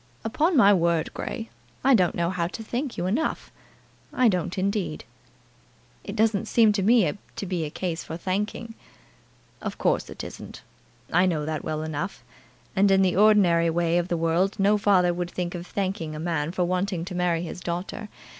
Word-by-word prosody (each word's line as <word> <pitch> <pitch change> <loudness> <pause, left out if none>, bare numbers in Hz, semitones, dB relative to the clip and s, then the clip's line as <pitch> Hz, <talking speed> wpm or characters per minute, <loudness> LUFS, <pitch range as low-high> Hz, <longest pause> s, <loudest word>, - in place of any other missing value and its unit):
"Upon 310 +9 +1
my 205 -4 +7
word, 170 -3 +1
Grey, 115 - -5 0.3
I 270 +1 +5
don't 185 -7 +3
know 170 0 0
how 170 -2 -1
to 225 +5 -7
thank 245 +4 -4
you 175 - -2
enough. 230 +13 -1 0.6
I 250 -2 +4
don't, 180 -2 -2
indeed." 195 -4 -1 1.0
"It 200 - -6
doesn't 220 -1 +1
seem 225 -2 +5
to 205 -1 0
me 210 -6 +4 0.2
to - - -4
be 175 -4 -2
a - - -4
case 170 +1 -4
for 160 - -6
thanking." 210 +5 -3 0.9
"Of - - -5
course - - 0
it - - -7
isn't. - - -9 0.5
I 180 +1 +4
know 155 -4 -1
that 155 -1 -3
well 155 0 -3
enough. 160 +5 -4 0.5
And 200 +1 +4
in 195 0 +5
the 185 -2 +2
ordinary 190 -5 +5
way 170 +1 +1
of 175 - -2
the 175 - -1
world 170 +5 +1
no 200 +2 +4
father 195 -4 +3
would 175 0 -3
think 175 -1 -4
of 175 0 -6
thanking 185 -6 -3
a - - -6
man 160 -2 -1
for 180 0 0
wanting 180 -1 -1
to 185 - -6
marry 175 -2 0
his 175 +1 -7
daughter. 180 +5 -4
180 Hz, 185 wpm, -25 LUFS, 170-205 Hz, 1.0 s, my